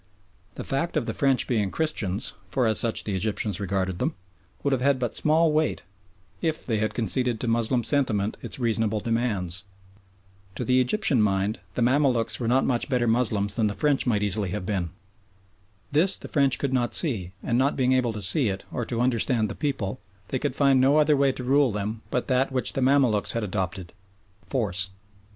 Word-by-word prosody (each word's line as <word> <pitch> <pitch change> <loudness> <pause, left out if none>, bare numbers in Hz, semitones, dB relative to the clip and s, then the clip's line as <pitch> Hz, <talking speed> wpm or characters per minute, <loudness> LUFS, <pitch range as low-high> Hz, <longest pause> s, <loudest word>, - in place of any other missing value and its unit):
The - - -6
fact 150 +5 -2
of 140 - -1
the - - -3
French 135 -2 +2
being 105 -6 0
Christians, 115 - -2 0.2
for 130 -3 0
as 110 -1 +5
such 115 -2 +3
the 100 - -3
Egyptians 105 0 -1
regarded 95 -2 -2
them, - - -1 0.5
would 140 - +1
have 130 -2 0
had 140 0 +3
but 120 -3 -3
small 160 +1 +3
weight 155 0 0 0.6
if 160 -1 -2
they 110 -4 -1
had 110 +1 -2
conceded 120 +2 0
to 120 - -4
Moslem 115 +1 +1
sentiment 110 -8 0
its - - -6
reasonable 110 -3 0
demands. 105 -6 -2 0.9
To - - -4
the 130 0 +3
Egyptian 135 - +2
mind 100 +1 0 0.2
the 120 - +1
Mamaluks 125 -4 +1
were 120 - -2
not 130 +3 +2
much 125 +2 -1
better 125 -3 +1
Moslems 110 -4 +1
than 110 0 +1
the 105 - -3
French 145 -3 +1
might 105 -4 +1
easily 105 -1 0
have 90 +1 -4
been. 90 -4 -2 1.0
This 175 +7 +3
the - - -9
French 140 -3 +2
could 140 -2 -2
not 120 -2 0
see, 100 - 0
and 120 0 0
not 135 +2 +1
being 130 -1 +2
able 130 -2 +1
to 105 -1 -3
see 110 - +4
it, 95 0 -5
or 120 - -3
to 120 0 -2
understand 120 -2 +1
the - - -4
people, 110 -7 -3 0.3
they 130 - -2
could 140 -2 -2
find 140 -2 +3
no 140 +3 +4
other 150 0 +4
way 140 -1 +3
to 130 - -7
rule 135 0 +3
them 105 +2 -4
but 125 - -2
that 130 +1 +1
which 130 -1 0
the 135 - -2
Mamaluks 130 -6 +2
had 115 - -2
adopted 95 -3 -4 0.5
force. 95 -8 -2
120 Hz, 195 wpm, -25 LUFS, 105-135 Hz, 1.0 s, as